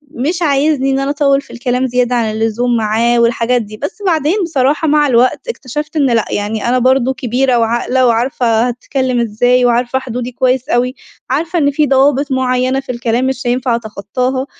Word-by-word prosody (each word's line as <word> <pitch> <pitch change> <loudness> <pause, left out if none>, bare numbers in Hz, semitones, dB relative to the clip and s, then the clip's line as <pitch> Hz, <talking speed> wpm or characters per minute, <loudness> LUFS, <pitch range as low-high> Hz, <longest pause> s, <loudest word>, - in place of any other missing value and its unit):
مش 320 +8 -2
عايزني 280 -2 +1
إن 270 - 0
أنا 275 +1 -1
أطوّل 280 -1 +2
في - - -15
الكلام 250 +1 -1
زيادة 250 0 0
عن 225 -3 0
اللزوم 225 +2 0
معاه 225 +2 +1
والحاجات 235 +1 +1
دي، 215 0 -9
بس 290 - -5
بعدين 320 0 +1
بصراحة 300 0 0
مع 295 0 +3
الوقت 255 - +1
اكتشفت 300 - -5
إن 290 -3 +2
لأ، 230 -2 +1
يعني 210 +2 -2
أنا 255 +1 +2
برضه 260 +1 +2
كبيرة 255 -1 0
وعاقلة 240 +3 +1
وعارفة 235 0 +1
هاتكلّم 255 +1 -2
إزاي 245 +2 +2
وعارفة 245 +2 +1
حدودي 250 -1 -5
كويس 255 +1 0
أوي، 250 +2 0 0.3
عارفة 325 +6 -1
إن 285 -1 +2
في 295 +1 +1
ضوابط 275 +1 +2
معيّنة 255 0 0
في 270 -1 -6
الكلام 240 +1 -1
مش 265 0 -3
هينفع 245 0 0
أتخطّاها، 235 +4 -3
255 Hz, 175 wpm, -14 LUFS, 235-275 Hz, 0.3 s, مع